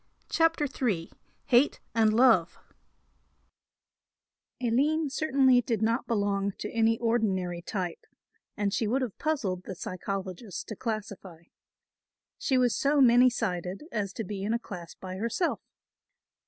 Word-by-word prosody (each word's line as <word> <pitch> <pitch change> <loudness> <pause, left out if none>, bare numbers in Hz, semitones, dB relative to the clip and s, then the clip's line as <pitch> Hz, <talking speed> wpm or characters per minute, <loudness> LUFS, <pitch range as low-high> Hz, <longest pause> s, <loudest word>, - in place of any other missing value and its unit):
CHAPTER 330 -2 +2
III 225 - -2 0.3
HATE 250 +4 +3
AND 220 -2 +4
LOVE 225 -9 +4 2.0
Aline 280 +5 +1
certainly 265 -4 +3
did 225 -3 -1
not 230 +2 0
belong 200 -2 0
to 210 - -5
any 225 0 +2
ordinary 195 -7 0
type 180 -1 -4 0.5
and 200 -1 0
she 220 - 0
would 260 +5 +1
have 235 -6 -6
puzzled 200 -13 -1
the 190 - -6
psychologist 190 +2 -5
to 215 - -5
classify. 200 -6 -5 1.0
She 265 - +1
was 245 -3 +3
so 285 +1 +2
many 250 -1 +7
sided 185 - -3
as 205 -3 -2
to 225 - -4
be 200 0 -5
in 215 +4 0
a - - +2
class 180 -7 -9
by 185 0 -7
herself. 235 - -1
225 Hz, 130 wpm, -28 LUFS, 190-250 Hz, 2.0 s, many